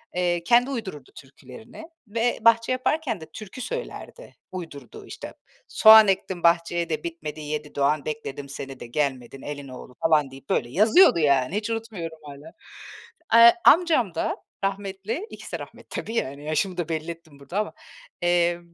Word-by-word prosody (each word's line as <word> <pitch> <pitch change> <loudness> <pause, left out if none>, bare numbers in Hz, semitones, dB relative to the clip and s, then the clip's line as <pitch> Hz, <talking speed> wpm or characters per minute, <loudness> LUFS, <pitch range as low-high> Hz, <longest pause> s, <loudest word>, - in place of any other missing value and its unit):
Eee, 175 -1 0
kendi 245 +5 +4
uydururdu 190 - -6
türkülerini 140 - -13 0.2
ve 230 +3 0
bahçe 230 +2 +4
yaparken 255 - -1
de - - -8
türkü 215 +3 -9
söylerdi. - - -7 0.2
Uydurduğu 155 -9 -9
işte: - - -9 0.3
”Soğan 220 -1 +8
ektim 190 -2 -2
bahçeye 170 0 +2
de 155 -2 -3
bitmedi, 155 -2 -6
yedi 150 0 -5
doğan 145 +1 +1
bekledim 145 -2 -6
seni 135 -1 -8
de 120 - -8
gelmedin 135 -1 -3
elin 145 -1 -7
oğlu,” 125 -1 -11
falan 150 -4 +3
deyip, 135 0 -14
böyle 120 - 0
yazıyordu, 215 - +5
yani. 140 +1 +2
Hiç 210 +1 -2
unutmuyorum 205 -8 -5
hâlâ. 145 0 -11 0.8
Eee, 235 0 +9
amcam 310 - +4
da - - -1 0.3
rahmetli. 200 - -4
İkisi - - -10
de - - -2
rahmetli, - - -12
tabii, 225 - -7
yani, 140 -5 -3
yaşımı 180 +4 -1
da 170 -2 -3
belli 160 +1 -3
ettim 160 -4 -14
burada 175 +9 -4
ama. 215 - -3 0.5
Eee, 175 0 +2
170 Hz, 155 wpm, -24 LUFS, 145-220 Hz, 0.8 s, Eee